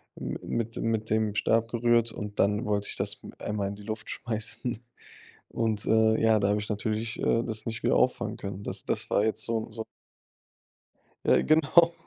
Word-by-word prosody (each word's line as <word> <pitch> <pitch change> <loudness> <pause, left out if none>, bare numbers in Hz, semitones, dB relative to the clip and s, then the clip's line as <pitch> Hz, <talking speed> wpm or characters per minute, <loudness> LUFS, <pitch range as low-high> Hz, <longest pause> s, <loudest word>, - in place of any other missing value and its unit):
mi - - -5
mit 115 -1 -3
mit 110 -1 -1
dem 110 -1 +1
Stab 115 +2 +2
gerührt 120 0 +2
und 105 -1 -7
dann 105 +4 +2
wollte 100 -1 0
ich - - -4
das - - 0 0.2
einmal 105 -2 -2
in 100 - -6
die 105 - -12
Luft 110 +1 -6
schmeißen. 110 +1 -1 0.7
Und, 110 -2 0
äh, 110 0 +3
ja, 110 -1 +4
da 100 0 +1
hab 105 - +2
ich 105 - -6
natürlich, 110 +1 -2
äh, 115 - +2
das 110 -1 -1
nicht 110 -1 -4
wieder - - +3
auffangen - - +1
können. 100 0 -6
Das - - -3
das - - -2
war 100 - +2
jetzt 110 - +1
so 115 -1 -2
so. 110 0 -6 1.4
Ja, - - +5
genau. 160 +2 +4
110 Hz, 185 wpm, -28 LUFS, 105-115 Hz, 1.4 s, Ja